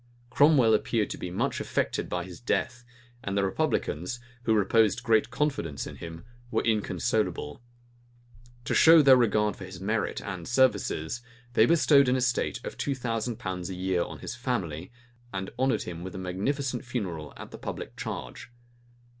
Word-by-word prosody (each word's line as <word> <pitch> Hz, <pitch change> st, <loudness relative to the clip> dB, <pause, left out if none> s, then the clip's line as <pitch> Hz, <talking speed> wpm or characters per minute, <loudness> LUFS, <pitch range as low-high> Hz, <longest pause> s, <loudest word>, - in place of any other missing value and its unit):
Cromwell 140 Hz, -6 st, +5 dB
appeared 110 Hz, -1 st, +1 dB
to -, -, -4 dB
be 90 Hz, -, -4 dB
much 90 Hz, -, -1 dB
affected -, -, -1 dB
by 90 Hz, 0 st, -2 dB
his 90 Hz, -1 st, -10 dB
death; 120 Hz, 0 st, -1 dB, 0.4 s
and 100 Hz, 0 st, -2 dB
the 100 Hz, -, +3 dB
republicans, 90 Hz, +2 st, -1 dB, 0.3 s
who 110 Hz, -, +3 dB
reposed 105 Hz, +1 st, +3 dB
great 110 Hz, -1 st, +3 dB
confidence 120 Hz, -, -2 dB
in -, -, -8 dB
him, 80 Hz, +3 st, -9 dB, 0.2 s
were -, -, 0 dB
inconsolable. 105 Hz, -6 st, -1 dB, 1.0 s
To -, -, -1 dB
show 165 Hz, -1 st, +8 dB
their 135 Hz, -2 st, +8 dB
regard 105 Hz, -4 st, +2 dB
for 95 Hz, -, -8 dB
his 90 Hz, -1 st, -9 dB
merit 105 Hz, +2 st, -1 dB
and 95 Hz, -4 st, -6 dB
services, 120 Hz, -6 st, +1 dB, 0.3 s
they 110 Hz, -1 st, +5 dB
bestowed 145 Hz, -5 st, +5 dB
an 125 Hz, -, +3 dB
estate 125 Hz, -2 st, 0 dB
of -, -, -7 dB
two 140 Hz, -, -1 dB
thousand 115 Hz, -2 st, -2 dB
pounds 90 Hz, -2 st, -4 dB
a 95 Hz, -, -5 dB
year 90 Hz, -1 st, 0 dB
on -, -, -4 dB
his -, -, -6 dB
family, 95 Hz, -, -3 dB, 0.4 s
and 95 Hz, -1 st, -4 dB
honored 130 Hz, 0 st, +2 dB
him 85 Hz, -1 st, -7 dB
with 90 Hz, 0 st, -7 dB
a -, -, -4 dB
magnificent 125 Hz, +9 st, -2 dB
funeral 95 Hz, -, -4 dB
at -, -, -9 dB
the -, -, -9 dB
public -, -, -6 dB
charge. -, -, -6 dB
110 Hz, 165 wpm, -28 LUFS, 90-125 Hz, 1.0 s, show